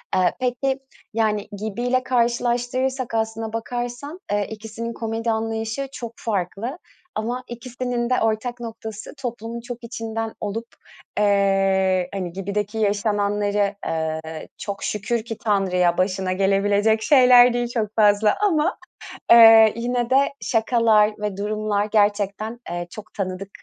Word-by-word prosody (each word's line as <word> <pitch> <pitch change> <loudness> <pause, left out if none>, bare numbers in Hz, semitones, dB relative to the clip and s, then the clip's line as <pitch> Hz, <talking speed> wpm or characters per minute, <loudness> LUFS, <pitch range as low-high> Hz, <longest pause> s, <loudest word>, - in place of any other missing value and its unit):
Eee, 180 -1 +3
peki 260 +2 -1 0.3
yani 215 -2 0
Gibi'yle 240 +5 -1
karşılaştırırsak 245 +1 0
aslına 225 0 -2
bakarsan, 245 +7 -4
eee, 205 -1 0
ikisinin 225 +2 -6
komedi 225 0 -2
anlayışı 225 +4 -2
çok 235 -2 -6
farklı. 220 - -3 0.4
Ama 240 +4 -3
ikisinin 240 0 -4
de 255 - +2
ortak 225 +2 -1
noktası 225 -1 -7
toplumun 235 -2 -5
çok 240 0 -8
içinden 225 -1 -4
olup, 225 +3 -4 0.5
eee, 195 -2 +2
hani 185 -3 -4
Gibi'deki 205 +3 -3
yaşananları, 205 -1 0
eee, 160 0 -3
çok 200 -1 -5
şükür 215 +2 -1
ki 225 -2 -6
Tanrı'ya 180 -4 +1
başına 185 0 0
gelebilecek 200 +3 +2
şeyler 250 -3 +7
değil 240 0 0
çok 215 -3 -2
fazla 210 -1 +4
ama. 335 0 +1 0.5
Eee, 225 -2 +9
yine 240 +1 -1
de 275 +2 +3
şakalar 225 -2 +3
ve 210 -2 -3
durumlar 210 0 -1
gerçekten, 210 +1 0
eee, 175 0 -4
çok 215 +3 -11
tanıdık 190 0 -4
220 Hz, 120 wpm, -22 LUFS, 205-240 Hz, 0.5 s, Eee